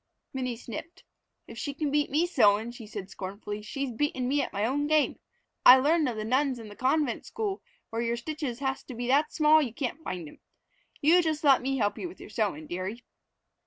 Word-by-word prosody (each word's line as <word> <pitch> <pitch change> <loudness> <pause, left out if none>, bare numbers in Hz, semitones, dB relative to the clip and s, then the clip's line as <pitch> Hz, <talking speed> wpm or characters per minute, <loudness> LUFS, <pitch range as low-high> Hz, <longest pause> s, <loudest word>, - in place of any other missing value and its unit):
Minnie 255 -3 -3
sniffed. 330 - -8 0.4
"If - - -10
she 285 -3 -4
can 295 -1 -1
beat 295 0 +1
me 310 +5 +2
sewin'," 225 - +3
she 240 -3 -10
said 200 -2 -7
scornfully, 205 +2 -6
"she's 275 +5 -4
beatin' 260 0 -1
me 285 +2 +2
at - - -3
my 205 +1 -1
own 290 +5 0
game. 305 -1 +2 0.4
I 255 - +10
learned 300 +2 +3
of 235 - -4
the 215 0 -4
nuns 260 +2 +1
in 225 -2 -9
the 205 - -11
convent 265 +1 +1
school 415 -3 -3 0.3
where 225 +1 -2
your 235 0 -1
stitches 285 -1 -4
has 265 -1 -1
to 255 - -8
be 245 +1 -4
that 295 +3 +3
small 310 0 +5
you 240 -6 -3
can't 275 +3 -3
find 175 - -5
'em. - - -14 0.6
You 335 +5 +6
just 315 -1 -1
let 275 -3 +6
me 270 +1 -1
help 205 -4 0
with 355 0 -7
your - - -11
sewin', 200 -9 -1
dearie." 185 +9 -5
260 Hz, 210 wpm, -28 LUFS, 225-295 Hz, 0.6 s, I